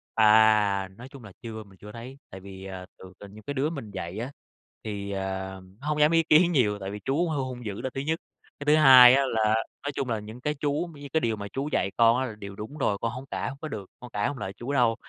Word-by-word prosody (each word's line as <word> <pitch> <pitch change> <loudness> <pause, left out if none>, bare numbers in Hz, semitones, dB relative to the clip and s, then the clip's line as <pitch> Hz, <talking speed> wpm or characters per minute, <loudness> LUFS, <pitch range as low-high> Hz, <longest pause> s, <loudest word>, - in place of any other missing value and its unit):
À, 105 -3 +5
nói 125 +2 -10
chung 135 -4 -13
là 100 - -11
chưa 110 -2 -7
mình 95 -2 -19
chưa 105 +2 -11
thấy, 125 +4 -9
tại 95 - -9
vì, 95 0 -10
ờ, 95 -1 -7 0.2
thường 95 0 -11
trên 100 0 -11
những 110 - -12
cái 145 +7 -5
đứa 145 +3 0
mình 135 -10 -7
dạy 95 0 -6
á, 120 +4 -4 0.5
thì, 100 -2 -5
ờ, 95 -1 -2 0.6
nó 150 - -7
hông 150 0 0
dám 150 +2 +5
ý 165 0 +4
kiến 170 +3 +5
nhiều 105 -10 +2
tại 95 0 -5
vì 105 - -6
chú 160 +6 +1
hơi 150 -3 -1
hung 130 -2 -5
dữ 105 +1 -5
là 130 - -2
thứ 135 - -3
nhất. 160 +4 -1 0.4
Cái 145 - -7
thứ 150 +1 +5
hai 130 -3 +10
á 140 +1 +4
là, 110 -3 +2 0.3
nói 145 - -2
chung 130 -3 -2
là, 110 -2 -1
những 110 +4 -10
cái 150 +3 -1
chú 145 0 -1
cũng 165 -4 -7
như 145 - -7
cái 160 - +4
điều 115 -2 0
mà 100 -1 -6
chú 140 +3 -2
dạy 95 - 0
con 115 0 +5
á 130 - 0
là 110 -4 -6
điều 100 -1 -8
đúng 110 +9 -8
rồi, 105 -8 0
con 115 - -1
hông 125 +2 -8
cãi - - -2
hông 140 - -9
có 155 - -4
được, 105 -9 -7
con 125 - -10
cãi 105 - 0
hông 145 -2 -4
lại 95 -5 -5
chú 120 +7 -5
đâu. 120 -4 +3
115 Hz, 285 wpm, -27 LUFS, 105-140 Hz, 0.6 s, hai